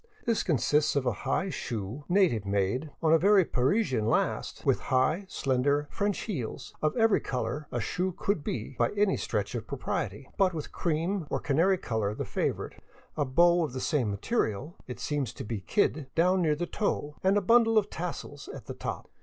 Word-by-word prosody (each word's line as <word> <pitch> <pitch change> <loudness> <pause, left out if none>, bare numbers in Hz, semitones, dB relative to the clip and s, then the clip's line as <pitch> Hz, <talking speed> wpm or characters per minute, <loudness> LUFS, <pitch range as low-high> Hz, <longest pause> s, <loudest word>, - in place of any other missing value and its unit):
This 230 -2 +2
consists 150 -1 +2
of 140 -2 +1
a 125 - +3 0.2
high 190 +7 +1
shoe, 115 - -5
native 175 - +3
made, 100 +8 0
on 160 0 +5
a 165 - +6
very 195 0 +5
Parisian 130 - +1
last, - - 0
with - - +3
high, 155 +9 +2
slender 140 +1 +1
" - - -23
French 205 -1 -1
heels," 135 - -5
of 155 +9 0
every 225 -2 +4
color 125 +4 -3
a 120 - -1
shoe 180 +11 -1
could 180 -2 -1
be 125 +1 -4
by 120 - +3
any 205 -1 +2
stretch - - -2
of - - -4
propriety, - - -3
but 185 -3 +3
with 155 - -5
cream 170 +1 -1
or - - -1
canary 170 +7 +2
color 110 - -2
the - - -3
favorite, - - -3 0.3
a 145 - +1
bow 170 +6 +4
of 150 - -3
the 130 - -3
same 130 -6 0
material 110 - -1
— - - -36
it 125 - -7
seems 140 -6 -2
to - - -7
be 110 0 -3
kid 155 - +1
— - - -44
down 180 +3 +3
near 155 -3 +2
the 175 +3 -2
toe 150 -7 -2
and 190 +2 +4
a - - +5
bundle 225 +2 +5
of 210 -1 +2
tassels 160 -4 -6
at - - -9
the - - -6
top. - - -5
150 Hz, 200 wpm, -29 LUFS, 125-190 Hz, 0.3 s, a